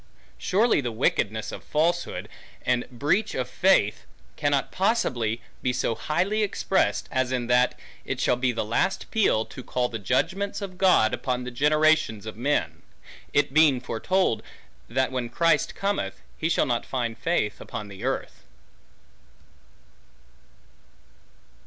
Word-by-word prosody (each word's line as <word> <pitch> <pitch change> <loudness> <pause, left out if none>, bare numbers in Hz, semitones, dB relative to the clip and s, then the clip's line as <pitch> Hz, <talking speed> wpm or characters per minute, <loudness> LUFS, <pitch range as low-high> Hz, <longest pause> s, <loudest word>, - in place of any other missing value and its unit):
Surely 205 - +2
the 120 -3 -3
wickedness 110 -2 0
of - - -8
falsehood, 170 +3 0 0.4
and 125 -1 0
breach 145 - 0
of 130 - -1
faith, 180 - +2 0.3
cannot 145 -2 0
possibly 125 - 0 0.2
be 125 - +1
so 125 -2 0
highly 185 - 0
expressed, 195 -2 0
as 130 -1 0
in 125 -2 -1
that 125 +1 +2 0.2
it - - -4
shall - - +3
be 125 0 +1
the 115 - -2
last 120 - -1
peal, 190 - +2
to 130 - -10
call 125 0 -1
the 115 - -5
judgments 165 - 0
of 190 -3 -7
God 180 - +4
upon 125 -1 -2
the 125 - -5
generations 150 -5 +2
of 110 - -6
men; 140 +6 -1 0.5
it 145 -1 +2
being 150 -4 +5
foretold, 130 +5 0 0.5
that 130 0 0
when 125 -2 -2
Christ 165 +5 +2
cometh, 200 0 -2
he 160 - -1
shall 170 - +2
not 120 -2 0
find 120 -3 -3
faith 115 -6 -1
upon 105 - -6
the 100 +2 -10
earth. 135 +1 -3
130 Hz, 140 wpm, -26 LUFS, 120-175 Hz, 0.5 s, being